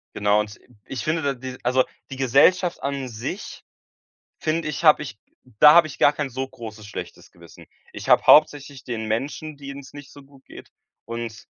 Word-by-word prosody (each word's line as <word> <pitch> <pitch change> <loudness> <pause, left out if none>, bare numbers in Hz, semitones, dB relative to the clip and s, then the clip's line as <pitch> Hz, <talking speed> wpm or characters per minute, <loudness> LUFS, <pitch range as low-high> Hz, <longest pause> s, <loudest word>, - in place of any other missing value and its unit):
Genau 105 0 +2
und 105 -1 -4
i 125 - -25
ich 130 -5 -6
finde, 160 +1 -1
da 140 -2 0
die 130 0 -8
also 125 +1 +3 0.3
die - - -5
Gesellschaft 140 +8 +3
an 140 -1 -3
sich, 125 - -7 0.8
finde 155 0 -2
ich 150 +3 -5
habe 155 -1 +6
ich 105 -8 -9 0.4
da 150 +4 +8
habe 170 -1 +6
ich 150 - -10
gar 145 - +5
kein 145 -2 -3
so 130 +2 -4
großes, 110 -4 -10
schlechtes 105 - -9
Gewissen. - - -16 0.3
Ich - - -9
habe - - +5
hauptsächlich 145 -2 +4
den 110 -3 -5
Menschen, 140 +6 -4
denen's 140 -1 -10
nicht 145 -2 -12
so 145 - -14
gut 135 -1 -21
geht - - -13 0.3
und 115 -1 -7
135 Hz, 185 wpm, -23 LUFS, 120-150 Hz, 0.8 s, da